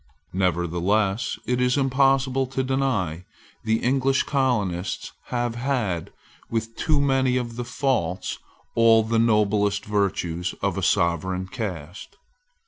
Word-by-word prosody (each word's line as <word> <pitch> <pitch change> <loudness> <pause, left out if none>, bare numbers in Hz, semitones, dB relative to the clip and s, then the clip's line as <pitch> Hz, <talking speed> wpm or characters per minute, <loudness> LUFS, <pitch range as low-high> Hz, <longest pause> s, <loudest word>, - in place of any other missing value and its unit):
Nevertheless 95 +4 0
it 125 0 0
is 125 +2 +2
impossible 135 -1 +2
to 130 +1 -2
deny 130 - 0
that 90 - -16 0.4
the 110 0 0
English 135 +2 +2
colonists 105 -10 -1
have 120 -1 -1
had, 120 - -2 0.4
with 115 0 -3
too 155 -2 +1
many 135 -2 +2
of 120 -2 -3
the 120 - -3
faults, 120 - -1 0.3
all 115 -1 +5
the 115 +1 +1
noblest 105 -2 +2
virtues 90 -4 -1
of - - +1
a - - -2
sovereign 90 +2 +1
caste. 95 - -6
115 Hz, 125 wpm, -24 LUFS, 95-130 Hz, 0.4 s, all